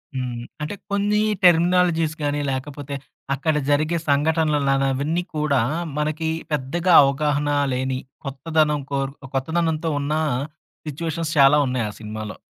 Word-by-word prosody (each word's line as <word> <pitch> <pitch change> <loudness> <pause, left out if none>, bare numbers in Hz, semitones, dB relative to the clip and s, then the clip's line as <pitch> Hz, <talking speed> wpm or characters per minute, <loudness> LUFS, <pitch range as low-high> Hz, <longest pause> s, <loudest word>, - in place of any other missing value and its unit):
హ్మ్. 125 -2 -3 0.2
అంటే, 150 +7 -3 0.2
కొన్ని 205 +1 +1 0.2
టెర్మినాలజీస్ 170 -2 +4
గాని, 145 0 0
లేకపోతే 140 +1 -5 0.4
అక్కడ 150 +3 0
జరిగే 155 +4 +2
సంఘటనలను 145 -2 +2
అవన్నీ 155 +6 -1
కూడా 150 -3 +1 0.4
మనకి 155 +2 -1 0.2
పెద్దగా 155 +6 0
అవగాహన 145 +1 +1 0.2
లేని, 130 0 -1 0.3
కొత్తదనం 150 +2 0
కోర్ 135 -1 -1 0.2
కొత్తదనంతో 160 +3 0
ఉన్నా, 150 +2 -1 0.7
సిట్యుయేషన్స్ 160 +1 -3
చాలా 140 +2 +7
ఉన్నాయి 125 -3 -1
ఆ - - -6
సినిమాలో. 110 -1 -6
150 Hz, 115 wpm, -22 LUFS, 135-160 Hz, 0.7 s, చాలా